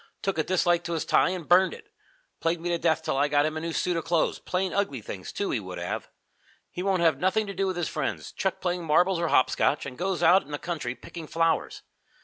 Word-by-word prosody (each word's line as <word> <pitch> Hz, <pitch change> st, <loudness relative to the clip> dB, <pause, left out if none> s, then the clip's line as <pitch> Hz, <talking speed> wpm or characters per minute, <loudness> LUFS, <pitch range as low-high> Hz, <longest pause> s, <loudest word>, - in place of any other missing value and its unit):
Took 195 Hz, -4 st, -1 dB
a -, -, +3 dB
dislike 175 Hz, -1 st, +2 dB
to 170 Hz, -, -2 dB
his 160 Hz, -, -2 dB
tie -, -, +4 dB
and 180 Hz, -4 st, -5 dB
burned 185 Hz, +2 st, +5 dB
it. 435 Hz, -2 st, -17 dB, 0.5 s
Plagued 165 Hz, +1 st, 0 dB
me 175 Hz, +1 st, -3 dB
to 170 Hz, -1 st, 0 dB
death 160 Hz, -1 st, +1 dB
till 155 Hz, -4 st, -1 dB
I 145 Hz, +1 st, +3 dB
got 145 Hz, 0 st, +3 dB
him 155 Hz, 0 st, -2 dB
a -, -, -2 dB
new 165 Hz, +1 st, -4 dB
suit 175 Hz, +2 st, 0 dB
of 165 Hz, -, -1 dB
clothes 165 Hz, 0 st, +1 dB
plain, 185 Hz, 0 st, -2 dB
ugly 195 Hz, -10 st, 0 dB
things, 95 Hz, -3 st, -7 dB
too, 200 Hz, -, -2 dB
he 120 Hz, -, 0 dB
would 95 Hz, -3 st, -7 dB
have. 85 Hz, 0 st, -4 dB, 0.6 s
He 180 Hz, -, -5 dB
won't 190 Hz, -2 st, +1 dB
have 160 Hz, -5 st, +3 dB
nothing 190 Hz, +5 st, +1 dB
to 200 Hz, -, -6 dB
do 195 Hz, +1 st, -1 dB
with 185 Hz, -1 st, -2 dB
his 175 Hz, -, -1 dB
friends, 150 Hz, -3 st, -3 dB
chucked 190 Hz, -1 st, -2 dB
playing 180 Hz, -1 st, -1 dB
marbles 175 Hz, +3 st, +3 dB
or 170 Hz, -, 0 dB
hopscotch, 145 Hz, +1 st, +2 dB
and 135 Hz, 0 st, -8 dB
goes 190 Hz, 0 st, -1 dB
out 180 Hz, +4 st, +6 dB
in 140 Hz, -, -17 dB
the 145 Hz, -, -3 dB
country, 150 Hz, -7 st, -4 dB
picking 165 Hz, +2 st, -9 dB
flowers. 165 Hz, +1 st, 0 dB
170 Hz, 250 wpm, -27 LUFS, 155-185 Hz, 0.6 s, out